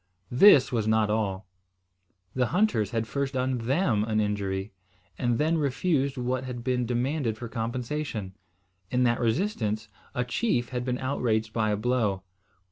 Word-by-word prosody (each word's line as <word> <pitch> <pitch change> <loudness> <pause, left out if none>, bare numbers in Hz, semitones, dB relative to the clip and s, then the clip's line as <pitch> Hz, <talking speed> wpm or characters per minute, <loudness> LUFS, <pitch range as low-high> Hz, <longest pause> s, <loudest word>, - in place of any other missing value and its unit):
This 135 0 +7
was 115 -3 0
not 110 -1 +3
all. 100 -3 -1 0.9
The 125 -1 +1
hunters 180 - +1
had 115 0 -1
first 140 +3 -3
done 130 -1 0
them 120 - +1
an 110 -1 0
injury, 100 -1 -2 0.5
and 120 -2 +1
then 160 +4 +2
refused 140 -1 0
what 125 +1 -1
had 125 -2 -6
been 125 -1 0
demanded 125 -1 -1
for 120 - -6
compensation. 115 -2 -3 0.6
In 125 0 +2
that 120 -1 +2
resistance, 110 - -1 0.3
a 125 - 0
chief 125 - 0
had 125 -1 -3
been 125 -1 -1
outraged 115 -5 -1
by 110 -1 +1
a 105 - +1
blow. 105 -5 0
120 Hz, 150 wpm, -27 LUFS, 110-130 Hz, 0.9 s, This